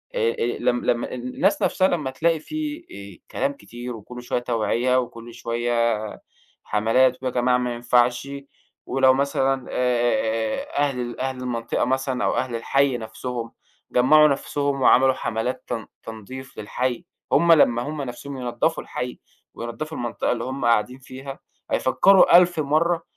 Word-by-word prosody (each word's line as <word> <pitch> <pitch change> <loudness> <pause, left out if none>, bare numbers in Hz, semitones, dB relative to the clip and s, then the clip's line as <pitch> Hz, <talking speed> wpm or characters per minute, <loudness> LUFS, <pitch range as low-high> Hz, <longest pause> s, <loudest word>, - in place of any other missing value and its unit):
أ - - -2
أ - - -7 0.2
لم 120 0 0
لمّا 120 0 0
الناس 125 - 0
نفسها 185 0 +3
لمّا 150 -8 -1
تلاقي 165 +2 +1
في 310 - -5 0.4
آآ - - -69
كلام 280 +1 -1
كتير 120 - -8
وكلّه 125 +3 -10
شويّة 120 0 -1
توعية، 120 +2 +1
وكل 120 -1 -7
شويّة 120 0 -3 0.9
حملات، 125 +5 +2
ويا 130 - -1
جماعة 125 0 +2
ما 125 -1 -2
ينفعش، 120 +2 +2 0.6
ولو 130 0 +4
مثلًا 135 -1 0
آآ 120 -3 0
أهل 140 -3 +1
ال 120 0 -6
أهل 130 0 -2
المنطقة 120 -2 -2
مثلًا 130 0 -1
أو - - +1
أهل 125 -2 -1
الحي 135 +3 +1
نفسهم 115 0 -6 0.4
جمَّعوا 150 +5 +6
نفسهم 140 -1 -1
وعملوا 130 +1 +5
حملات 125 +2 -3
تن 115 -2 -4 0.2
تنضيف 120 +5 -9
للحي، 125 - -3 0.3
همّ 170 0 +6
لمّا 120 -6 +4
همّ 150 +2 -4
نفسهم 135 +2 -7
ينضفوا 125 +6 -1
الحي 125 0 -5 0.3
وينضفوا 120 +7 -6
المنطقة 120 -1 -2
اللي 115 -1 -2
هم 130 -1 -4
قاعدين 120 +3 +2
فيها 135 +1 -9 0.3
هيفكرو 195 +9 +5
ألف 175 -2 +6
مرّة 165 +3 +1
125 Hz, 145 wpm, -23 LUFS, 120-140 Hz, 0.9 s, جمَّعوا